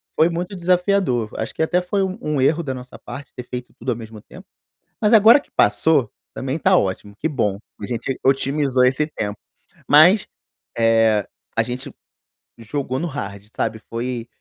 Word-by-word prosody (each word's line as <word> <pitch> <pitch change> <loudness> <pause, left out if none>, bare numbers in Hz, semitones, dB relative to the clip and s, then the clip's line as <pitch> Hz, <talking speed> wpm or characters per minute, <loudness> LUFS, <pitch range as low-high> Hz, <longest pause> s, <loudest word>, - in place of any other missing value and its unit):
foi 160 - +4
muito 175 +3 -4
desafiador, 180 - +1
acho 110 - -4
que - - -4
até 175 +3 +2
foi 195 +2 -1
um 190 0 -3
um 150 -3 -1
erro 160 +5 +2
da 135 -4 -3
nossa 125 0 -10
parte 140 0 -9
ter 125 - -6
feito 125 0 -6
tudo 125 +2 -2
ao - - -1
mesmo 110 -2 -10
tempo. - - -14 0.6
Mas 210 +1 +3
agora 225 +5 +8
que - - -19
passou, 115 +5 +3 0.2
também 135 +4 -3
tá - - +4
ótimo, 100 +2 -2
que 160 - -1
bom, 105 -9 0 0.2
a - - -3
gente 125 +2 -3
otimizou 135 -1 +2
esse 130 +4 +2
tempo. 105 -9 -4 0.5
Mas, 175 +8 +6 0.5
eh, 115 -2 +3 0.3
a 115 - +4
gente 125 +2 -6 0.7
jogou 130 +3 -3
no 170 - -2
hard 100 - -6
sabe, 110 - -2
foi 120 0 -3
130 Hz, 175 wpm, -21 LUFS, 115-160 Hz, 0.7 s, agora